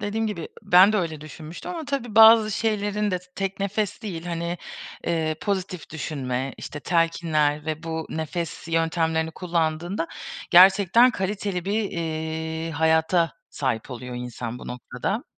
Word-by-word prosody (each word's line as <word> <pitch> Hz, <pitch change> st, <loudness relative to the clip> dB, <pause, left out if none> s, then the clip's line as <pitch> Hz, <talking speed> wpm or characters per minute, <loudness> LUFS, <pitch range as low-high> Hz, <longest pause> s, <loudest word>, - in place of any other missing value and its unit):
dediğim 215 Hz, +2 st, -1 dB
gibi 185 Hz, -7 st, -4 dB
ben 185 Hz, +4 st, +7 dB
de -, -, +2 dB
öyle 160 Hz, -5 st, -2 dB
düşünmüştüm 155 Hz, -, -9 dB
ama 330 Hz, -3 st, -5 dB
tabii 265 Hz, -6 st, -3 dB
bazı 220 Hz, -1 st, +8 dB
şeylerin 210 Hz, -1 st, 0 dB
de 180 Hz, -, 0 dB, 0.2 s
tek 195 Hz, 0 st, -3 dB
nefes 205 Hz, +1 st, -2 dB
değil, 175 Hz, -5 st, -5 dB
hani, 170 Hz, 0 st, -3 dB, 0.5 s
eee, 160 Hz, -2 st, 0 dB
pozitif 185 Hz, -4 st, -3 dB
düşünme, 135 Hz, -4 st, -3 dB
işte 145 Hz, -, -7 dB
telkinler 160 Hz, -2 st, +1 dB
ve 155 Hz, 0 st, -3 dB
bu 160 Hz, -1 st, -4 dB
nefes 165 Hz, +1 st, -4 dB
yöntemlerini 165 Hz, 0 st, +1 dB
kullandığında 170 Hz, +1 st, -1 dB, 0.4 s
gerçekten 195 Hz, +6 st, +7 dB
kaliteli 190 Hz, -3 st, -3 dB
bir, 205 Hz, +1 st, -1 dB
eee, 160 Hz, 0 st, -3 dB
hayata 160 Hz, +2 st, +2 dB, 0.2 s
sahip 130 Hz, -3 st, -2 dB
oluyor 125 Hz, 0 st, -6 dB
insan 120 Hz, -1 st, -5 dB
bu -, -, -10 dB
noktada. 125 Hz, -, -4 dB
170 Hz, 135 wpm, -24 LUFS, 160-200 Hz, 0.5 s, bazı